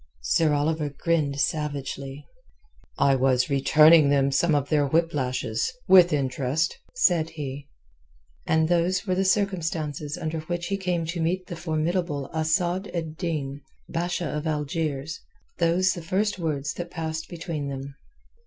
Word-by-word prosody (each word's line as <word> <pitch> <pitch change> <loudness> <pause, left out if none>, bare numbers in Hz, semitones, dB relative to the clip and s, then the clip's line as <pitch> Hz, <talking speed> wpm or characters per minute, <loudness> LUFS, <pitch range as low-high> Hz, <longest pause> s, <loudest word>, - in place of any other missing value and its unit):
Sir 155 - +2
Oliver 150 +1 0
grinned 145 -1 -1
savagely. 140 -1 -3 0.7
"I 140 0 +4
was 130 0 +2
returning 150 +2 +6
them 140 -1 +3
some 155 +3 +2
of 140 -1 0
their 145 -2 +2
whip 165 +3 +1
lashes—with 170 - +2
interest," 140 +2 0 0.2
said 170 - +3
he. 145 -3 -7 0.8
And 160 0 +3
those 175 +3 +1
were 185 - 0
the 190 +1 +1
circumstances 165 -7 -1
under 160 0 -3
which 170 +2 -4
he 195 - 0
came 180 -3 -1
to 170 +1 -3
meet 180 +3 0
the 180 - -7
formidable 160 -2 -2
Asad 175 +4 0
ed 160 -2 -3
Din, 145 -5 -3 0.3
Basha 175 +1 -2
of 150 +1 -3
Algiers, 150 0 -2 0.4
those 175 +2 +3
the 175 - -7
first 195 +4 -1
words 150 -3 -2
that 175 0 -6
passed 160 -2 -4
between 165 -4 -4
them. 135 0 -6
160 Hz, 140 wpm, -25 LUFS, 145-175 Hz, 0.8 s, returning